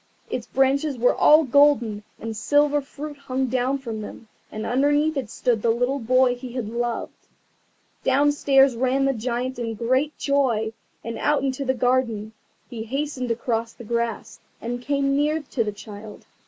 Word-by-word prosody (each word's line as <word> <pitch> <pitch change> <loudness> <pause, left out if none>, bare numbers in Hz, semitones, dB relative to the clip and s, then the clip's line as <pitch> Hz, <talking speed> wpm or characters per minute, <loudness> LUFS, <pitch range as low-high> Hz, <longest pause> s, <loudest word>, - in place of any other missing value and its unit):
Its - - -3
branches 270 +1 +1
were 245 +1 +3
all 305 +2 +6
golden, 260 -6 +3 0.2
and 225 -1 -5
silver 290 +5 +2
fruit 290 +2 -8
hung 265 -2 -2
down 255 +2 0
from 230 -5 -6
them, 220 +2 -9 0.2
and 215 +1 -5
underneath 290 +5 +2
it 260 -6 -3
stood 235 -1 0
the 230 - +1
little 245 +4 +1
boy 255 +1 +3
he 245 0 -8
had 250 -4 -3
loved. 235 0 -4 0.8
Downstairs 275 -1 +4
ran 260 +3 +1
the 275 - +2
Giant 245 +2 -3
in 230 -2 -3
great 260 +6 0
joy, 245 -6 +1 0.3
and 230 0 -5
out 295 -2 +1
into 270 0 -1
the 260 0 +1
garden. 235 -4 0 0.3
He 230 -2 -7
hastened 270 0 -3
across 230 -1 -2
the - - -12
grass, 230 -1 -3 0.2
and 240 +1 -4
came 275 +1 0
near 300 +2 +1
to 235 - +1
the 210 - -3
child. 210 +1 -11
255 Hz, 165 wpm, -23 LUFS, 230-275 Hz, 0.8 s, all